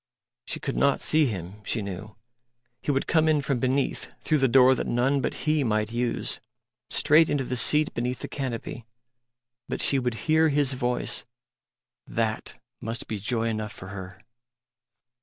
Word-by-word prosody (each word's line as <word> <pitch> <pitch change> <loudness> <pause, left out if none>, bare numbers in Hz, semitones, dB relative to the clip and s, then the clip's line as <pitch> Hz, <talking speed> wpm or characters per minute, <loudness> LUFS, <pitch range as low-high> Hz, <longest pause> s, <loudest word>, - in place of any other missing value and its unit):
She - - -3
could - - -4
not 140 -1 +3
see 155 -2 +4
Him, 95 -1 -6
she 110 +1 -1
knew. 100 +2 -7 0.7
He - - -5
would 135 -1 +1
come 160 -1 +3
in 155 -1 +3
from 140 -2 -1
beneath 130 +3 -1
through 155 -2 +2
the 135 - +4
door 130 +1 +6
that - - -3
none 135 +4 +1
but - - -4
He 155 -1 +2
might 110 -2 0
use, 120 0 -1 0.5
straight 155 +2 +4
into 145 -2 0
the 125 0 -3
seat 150 +5 +2
beneath 125 +1 -3
the - - -4
canopy. 120 -3 -5 0.8
But - - -3
she 135 - +5
would 125 -2 -2
hear 160 0 +4
His 140 -2 +2
voice 125 -1 0 0.8
that 110 -1 -2 0.2
must 115 +1 -2
be 110 -2 -4
joy 115 +3 -1
enough 110 -1 -4
for 95 - -10
her.... 95 -1 -8
125 Hz, 165 wpm, -26 LUFS, 110-140 Hz, 0.8 s, door